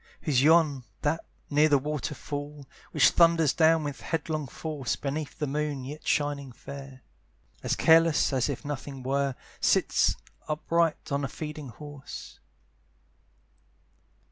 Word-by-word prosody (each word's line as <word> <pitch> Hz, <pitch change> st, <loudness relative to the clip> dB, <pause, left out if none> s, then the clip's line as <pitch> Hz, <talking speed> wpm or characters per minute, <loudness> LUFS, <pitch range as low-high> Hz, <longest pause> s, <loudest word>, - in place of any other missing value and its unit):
Who's 135 Hz, -5 st, +2 dB
yon, 150 Hz, -3 st, +4 dB, 0.2 s
that, 160 Hz, +2 st, 0 dB, 0.3 s
near 150 Hz, +2 st, +5 dB
the 145 Hz, -, +5 dB
waterfall, 145 Hz, 0 st, -4 dB, 0.3 s
Which -, -, +5 dB
thunders 165 Hz, -3 st, +4 dB
down 160 Hz, -1 st, +4 dB
with 145 Hz, -2 st, -5 dB
headlong 155 Hz, -2 st, -2 dB
force, 145 Hz, -3 st, -3 dB
Beneath 145 Hz, +1 st, -4 dB
the 150 Hz, -, -1 dB
moon, 145 Hz, -1 st, -2 dB
yet 150 Hz, +4 st, -8 dB
shining 145 Hz, -2 st, 0 dB
fair, 135 Hz, +1 st, -10 dB, 0.6 s
As -, -, 0 dB
careless 165 Hz, -2 st, +4 dB
as 130 Hz, +1 st, +1 dB
if 140 Hz, +1 st, -4 dB
nothing 140 Hz, -2 st, -5 dB
were, 135 Hz, 0 st, 0 dB, 0.2 s
Sits -, -, +3 dB, 0.3 s
upright 160 Hz, +1 st, 0 dB
on 140 Hz, 0 st, 0 dB
a -, -, 0 dB
feeding 150 Hz, -1 st, -7 dB
horse? 145 Hz, +3 st, -10 dB
145 Hz, 125 wpm, -28 LUFS, 140-155 Hz, 0.6 s, near